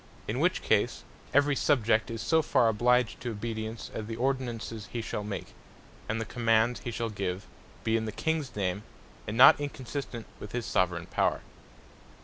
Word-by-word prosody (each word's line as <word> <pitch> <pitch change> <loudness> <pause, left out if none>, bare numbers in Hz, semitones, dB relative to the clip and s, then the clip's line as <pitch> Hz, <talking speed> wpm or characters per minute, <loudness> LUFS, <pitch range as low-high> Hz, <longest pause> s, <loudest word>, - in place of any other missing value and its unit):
In - - -1
which - - +1
case, - - +1 0.3
every 145 0 +4
Subject 115 -7 +2
is 115 -1 -4
so 160 -1 +3
far 130 -6 +3
obliged 125 +2 +2
to 120 - -3
obedience, 110 0 -5
as 110 - -5
the 115 - -4
Ordinances 120 -4 -2
he 120 - -3
shall 110 -2 -3
make, 100 -1 -6 0.6
and 110 +1 0
the 115 - -2
commands 115 +1 +2
he - - -5
shall 115 -1 -3
give 95 -2 -3 0.4
be 110 - +1
in 110 -1 0
the 110 - -3
Kings 160 +2 -2
name, 95 -1 -1 0.5
and 105 +2 -3
not 130 +3 +9
inconsistent 135 -4 -5
with 105 - -9
his 120 -2 -2
Soveraigne 90 -1 0
Power. - - +1
115 Hz, 170 wpm, -29 LUFS, 110-125 Hz, 0.6 s, not